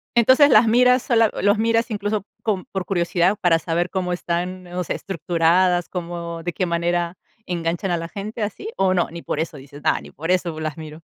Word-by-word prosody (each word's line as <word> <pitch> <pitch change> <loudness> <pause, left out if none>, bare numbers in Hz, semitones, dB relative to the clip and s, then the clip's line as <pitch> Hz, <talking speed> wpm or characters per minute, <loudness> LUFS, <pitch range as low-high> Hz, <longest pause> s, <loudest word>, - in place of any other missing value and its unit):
Entonces, 260 +5 +6
las 230 -3 +6
miras 250 +2 +4
sola 230 -3 +3
los 205 +3 +3
miras, 230 +2 +1
incluso, 205 -1 -2 0.2
con 200 -5 -1
por 190 -2 -3
curiosidad, 175 +1 +1
para 165 -2 +3
saber 170 +2 -1
cómo 180 -2 -2
están, 180 +1 -3
o 180 +1 -3
sea, - - -3
estructuradas, 175 -1 +1
cómo 170 -1 -5
de 175 0 -3
qué 185 - -1
manera 170 +1 -1 0.3
enganchan 175 +2 -2
a 175 - +1
la 165 0 -5
gente 210 +5 -6
así, 215 - -4
¿o 190 -1 +3
no? 175 -2 +1
Ni 170 0 -7
por 150 - -3
eso 160 -1 -3
dices: 145 +2 -12
"No, - - +2
ni - - -13
por 165 +6 -3
eso 175 -3 +1
me 155 - -7
las 155 -1 -4
miro". 155 0 -9
180 Hz, 210 wpm, -22 LUFS, 170-205 Hz, 0.3 s, Entonces